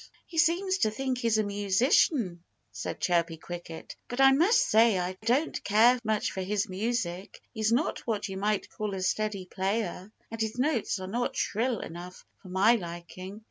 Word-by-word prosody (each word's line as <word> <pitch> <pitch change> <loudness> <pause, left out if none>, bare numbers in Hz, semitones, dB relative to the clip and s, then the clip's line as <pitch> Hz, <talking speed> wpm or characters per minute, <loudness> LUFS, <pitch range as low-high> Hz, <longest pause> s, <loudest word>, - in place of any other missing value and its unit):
"He 330 - -3
seems 375 +4 +2
to 215 - +3
think 255 +3 -2
he's 230 -3 +2
a 215 - +2
musician," 205 - +2 0.3
said - - -5
Chirpy 170 -2 +1
Cricket. 170 0 -8
"But 245 - -6
I 270 0 +7
must 350 - +4
say 220 -2 +5
I 180 +1 -2
don't 265 +7 +1
care 230 +5 +5
much 215 -1 0
for 190 - -4
his 205 +3 -1
music. 195 -2 -3
He's 220 -1 0
not 245 +7 +1
what 215 -3 -1
you 195 - -6
might 205 +1 0
call 210 -2 -4
a 190 - -4
steady 205 0 -1
player. 190 +1 -3 0.2
And 225 0 -5
his 220 +1 -2
notes 255 -5 0
are 185 - -5
not 240 +6 -2
shrill 230 +2 -1
enough 175 +2 -9 0.2
for 185 - -12
my 195 +5 +4
liking. 180 +2 -8
215 Hz, 180 wpm, -28 LUFS, 185-240 Hz, 0.3 s, I